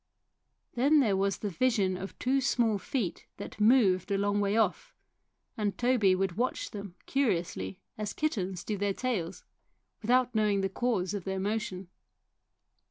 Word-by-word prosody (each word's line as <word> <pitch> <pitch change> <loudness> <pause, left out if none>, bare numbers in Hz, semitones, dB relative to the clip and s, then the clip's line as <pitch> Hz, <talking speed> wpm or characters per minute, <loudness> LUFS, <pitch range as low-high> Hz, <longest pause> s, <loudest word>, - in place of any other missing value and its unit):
Then 285 +5 +4
there 220 -8 +3
was 195 -1 0
the 205 - -3
vision 200 -2 +1
of 190 +2 -7
two 270 +2 +1
small 235 -5 +2
feet 215 -4 -3
that 210 - -8
moved 210 -5 +4
a 200 - +1
long 205 +1 +1
way 200 +1 +1
off, 210 -6 0 0.6
and 205 -2 -2
Toby 240 -6 +3
would 190 -1 -1
watch 250 +2 -1
them 200 -4 -8
curiously 195 -8 -1 0.2
as 210 -1 -2
kittens 195 - -2
do 210 -2 -3
their 200 -1 0
tails, 195 -9 -3 0.6
without 250 +2 +2
knowing 210 -3 +2
the 195 - 0
cause 205 -3 -1
of 200 -3 -3
their 190 0 -3
motion. 200 -2 -3
205 Hz, 155 wpm, -30 LUFS, 190-240 Hz, 0.6 s, Then